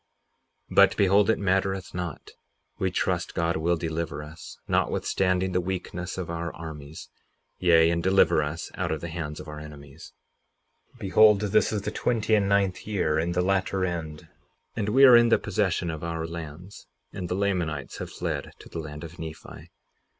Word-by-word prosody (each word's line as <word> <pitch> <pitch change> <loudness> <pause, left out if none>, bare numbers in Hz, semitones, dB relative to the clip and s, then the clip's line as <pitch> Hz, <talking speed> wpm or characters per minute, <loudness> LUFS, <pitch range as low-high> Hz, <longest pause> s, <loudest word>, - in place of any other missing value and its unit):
58:37 - - -7
But, - - +6
behold, 100 +1 +4
it 110 - +3
mattereth 95 -1 0
not—we 90 -6 -6
trust - - -1
God 85 0 0
will 85 +2 +1
deliver 80 -2 -3
us, 80 +3 -11
notwithstanding 95 0 +1
the 90 0 +1
weakness 90 0 -4
of 95 -3 -4
our 85 -1 -4
armies, 80 -1 -9 0.5
yea, 85 -2 +5
and 85 0 0
deliver 95 -3 +4
us 75 +3 -4
out 90 -3 -2
of 80 - -2
the 85 - -5
hands 80 -2 -5
of - - -9
our 75 0 -7
enemies. 70 -2 -12 0.8
58:38 - - -20
Behold, 105 +1 +5
this 105 +1 +2
is 105 -2 -2
the - - -3
twenty 110 -2 0
and 100 -2 +3
ninth 100 -2 +1
year, 80 -7 +1
in 85 +2 -1
the 90 +1 +1
latter 95 0 +1
end, 80 -4 -5 0.5
and 105 -1 -1
we 135 +5 +7
are 125 -2 +9
in 120 0 +6
the - - +5
possession 95 -4 -1
of 80 0 -7
our 80 -1 -3
lands; 85 +3 -9 0.3
and 90 -4 -5
the 90 - -1
Lamanites 90 -8 -2
have - - -5
fled - - -4
to - - -14
the 85 - -6
land 75 0 -7
of 85 +2 -10
Nephi. 80 -1 -9
90 Hz, 180 wpm, -26 LUFS, 80-95 Hz, 0.8 s, are